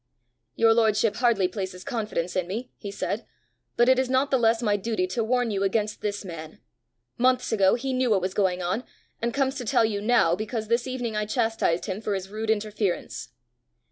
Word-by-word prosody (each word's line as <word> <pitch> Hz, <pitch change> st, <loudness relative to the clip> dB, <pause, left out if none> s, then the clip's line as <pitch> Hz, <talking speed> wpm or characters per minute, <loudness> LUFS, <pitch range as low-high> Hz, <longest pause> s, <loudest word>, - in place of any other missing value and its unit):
"Your 225 Hz, 0 st, +5 dB
lordship 220 Hz, -1 st, +2 dB
hardly 235 Hz, -6 st, +3 dB
places 185 Hz, -1 st, -5 dB
confidence 210 Hz, -9 st, -3 dB
in 180 Hz, -2 st, 0 dB
me," 230 Hz, +7 st, -5 dB
he 205 Hz, -, -7 dB
said; 200 Hz, -, -3 dB, 0.5 s
"but 240 Hz, -, +5 dB
it 260 Hz, 0 st, +5 dB
is 260 Hz, -1 st, 0 dB
not 265 Hz, +2 st, +2 dB
the 265 Hz, -, +3 dB
less 225 Hz, 0 st, +3 dB
my 210 Hz, -2 st, +2 dB
duty 205 Hz, -2 st, -1 dB
to 185 Hz, +5 st, -2 dB
warn 245 Hz, 0 st, +1 dB
you 195 Hz, -1 st, -1 dB
against 210 Hz, +2 st, 0 dB
this 205 Hz, -1 st, -3 dB
man: 160 Hz, -3 st, -8 dB, 0.6 s
months 255 Hz, 0 st, +2 dB
ago 195 Hz, -4 st, +4 dB
he 260 Hz, +2 st, -3 dB
knew 255 Hz, -1 st, +1 dB
what 205 Hz, -3 st, +4 dB
was 185 Hz, +1 st, -2 dB
going 185 Hz, -3 st, +1 dB
on, 185 Hz, +8 st, -1 dB, 0.4 s
and 235 Hz, +1 st, 0 dB
comes 270 Hz, +1 st, +1 dB
to 250 Hz, -, -4 dB
tell 225 Hz, 0 st, +3 dB
you 205 Hz, -2 st, -2 dB
now 210 Hz, -7 st, +3 dB
because 215 Hz, +2 st, -4 dB
this 235 Hz, +2 st, +1 dB
evening 245 Hz, -4 st, -3 dB
I 210 Hz, 0 st, -1 dB
chastised 225 Hz, -7 st, 0 dB
him 195 Hz, 0 st, -4 dB
for 210 Hz, -2 st, -1 dB
his 190 Hz, 0 st, -5 dB
rude 215 Hz, +2 st, -4 dB
interference." 205 Hz, -, -1 dB
215 Hz, 205 wpm, -26 LUFS, 195-240 Hz, 0.6 s, Your